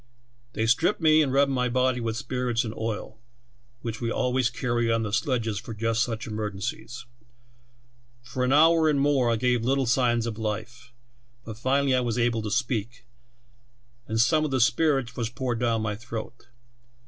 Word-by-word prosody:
"They 110 - -1
stripped 140 - +2
me, 155 -1 +5
and 140 -4 +1
rubbed 140 +1 +3
my 125 -1 0
body 130 0 +1
with 115 -1 -2
spirits 125 -1 -1
and 110 -2 -5
oil, 110 0 -5 0.6
which 115 -1 -5
we 115 - -1
always 125 -1 +1
carry 120 -2 -1
on 115 0 +1
the 105 -2 -4
sledges 115 -5 0
for 115 - -8
just 115 +1 0
such 115 -1 -2
emergencies. 110 +3 -5 1.2
For 125 +1 -3
an 125 - +1
hour 160 +2 +5
and 145 -2 +2
more 135 -3 +2
I - - +2
gave 120 0 +1
little 135 +2 +1
signs 120 -1 +2
of 115 -1 -5
life, 110 +3 -5 0.5
but 110 -1 -8
finally 135 +2 +2
I 130 - +3
was 120 -2 -1
able 120 -2 +1
to 105 - -4
speak, 120 0 -2 1.0
and 110 0 -1
some 155 +7 +3
of 155 - -1
the 135 -1 0
spirits 125 0 +2
was 115 -2 -2
poured 120 0 -3
down 115 -2 0
my 105 -1 -2
throat. 115 +2 -8
120 Hz, 175 wpm, -26 LUFS, 115-130 Hz, 1.2 s, me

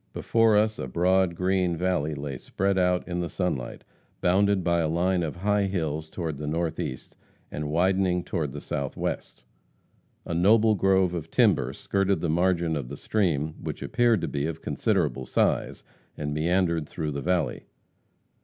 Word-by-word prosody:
Before 115 -2 +3
us 110 +1 +1
a - - -3
broad, 90 +4 +2
green 90 -1 +1
valley 85 -4 0
lay 70 -1 -5
spread 95 +8 -1
out 90 0 +1
in 90 -1 -3
the 85 -1 -2
sunlight, 90 -10 -3 0.4
bounded 100 +1 +2
by 85 0 +2
a 80 - +1
line 90 +2 +1
of 80 -3 -3
high 100 +2 +1
hills 80 -4 -2
toward 80 -5 -4
the 75 - -4
northeast, 80 -5 -3 0.4
and 75 0 -4
widening 90 +2 +2
toward 80 -8 -2
the - - -7
southwest. 70 -3 -4 0.8
A - - -4
noble 110 +6 +4
grove 95 -2 +2
of 80 -2 -5
timber 65 - +3
skirted 95 +6 0
the 85 - -2
margin 85 -1 +1
of 70 -5 -4
the - - -7
stream, 80 -8 0
which - - -5
appeared 120 -5 +2
to - - -2
be 70 +1 -2
of 80 0 -6
considerable 65 - 0
size, - - 0 0.3
and 75 -1 -3
meandered 85 0 +1
through 80 -3 -3
the 70 -1 -4
valley. 90 -1 -1
85 Hz, 165 wpm, -26 LUFS, 80-95 Hz, 0.8 s, noble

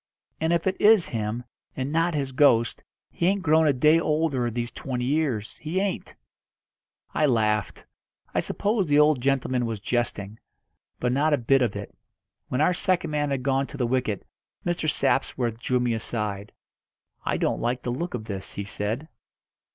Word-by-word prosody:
And 160 +1 +1
if 170 -1 +1
it 190 0 -1
is 210 -4 +6
him, 115 +1 -3 0.3
and 130 +1 -3
not 165 +1 +1
his 135 -2 -1
ghost, 120 -4 +3 0.3
he 170 - 0
ain't 195 0 +1
grown 160 0 +4
a - - +5
day 150 +5 +4
older 150 -6 0
these 120 +1 -3
twenty 125 0 -4
years, 130 -8 -1
he 160 +4 -2
ain't." 195 -1 -3 1.0
I 155 - +3
laughed. 110 -4 0 0.5
I - - +2
supposed 200 -5 0
the 145 - +4
old 150 -3 +4
gentleman 130 -2 +1
was 110 -2 -3
jesting. 110 -2 -2 0.6
But 125 - 0
not 150 +4 +2
a - - -4
bit 135 +2 +3
of 120 -5 +1
it. - - -7 0.5
When 125 - -1
our 170 +4 +4
second 175 -2 0
man 145 -1 0
had 135 -2 -2
gone 135 0 +1
to - - -9
the 125 - 0
wicket 120 -4 -1 0.4
Mr. 175 -3 0
Sapsworth 120 -5 0
drew 125 +1 0
me 120 -1 +1
aside. 105 -2 -3 0.7
"I - - 0
don't - - 0
like 125 +1 -1
the 120 - -2
look 160 +5 -3
of 110 -3 -6
this," 100 -3 -6
he 100 - -4
said. 110 +8 -3
130 Hz, 175 wpm, -25 LUFS, 115-155 Hz, 1.0 s, is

